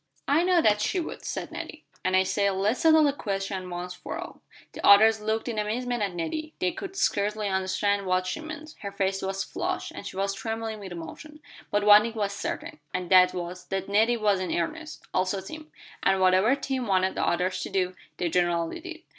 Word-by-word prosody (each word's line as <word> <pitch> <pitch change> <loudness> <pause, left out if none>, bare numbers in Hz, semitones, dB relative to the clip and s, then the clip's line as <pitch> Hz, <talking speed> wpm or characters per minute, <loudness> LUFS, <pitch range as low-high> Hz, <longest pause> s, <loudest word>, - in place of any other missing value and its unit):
"I 290 +4 +4
know 355 -2 +3
that 210 -1 +4
she 365 - 0
would," 335 - -6
said - - -4
Nettie; - - -8 0.2
"and 185 - +1
I 190 - +5
say, 200 +1 +1
let's 200 +5 0
settle 315 -2 +6
the 285 -2 +3
question 195 -5 -3
once 180 0 -5
for - - -6
all." - - -8 0.3
The - - -8
others 220 +2 +7
looked 220 +2 -1
in 225 -3 -2
amazement 240 +3 -2
at 195 -3 -1
Nettie; 310 - -4
they 180 - 0
could 390 -1 -7
scarcely 210 - 0
understand 195 +1 0
what 185 0 +1
she 185 - -3
meant. 310 0 -8
Her 200 - -5
face 195 -1 -1
was 195 0 -2
flushed, - - -3
and - - -8
she - - -8
was 195 0 0
trembling 225 +1 -4
with 195 -3 -8
emotion, 175 - -9 0.3
but 205 0 +1
one 210 0 +9
thing 230 +1 -4
was 205 -2 -1
certain, 200 - -5 0.2
and 180 0 -3
that 185 -1 +6
was 180 +1 -5
that 195 0 -3
Nettie 220 +4 +3
was 205 -3 +2
in 185 - -3
earnest 310 - -3
also 185 +1 +1
Tim; 310 +11 -9 0.3
and 195 0 +3
whatever 185 +7 +4
Tim 265 -3 -3
wanted 190 -1 +2
the - - -2
others 180 +2 0
to - - -4
do 185 -1 -1 0.2
they 175 - 0
generally 170 -1 0
did. 340 -3 -9
200 Hz, 210 wpm, -27 LUFS, 185-235 Hz, 0.3 s, one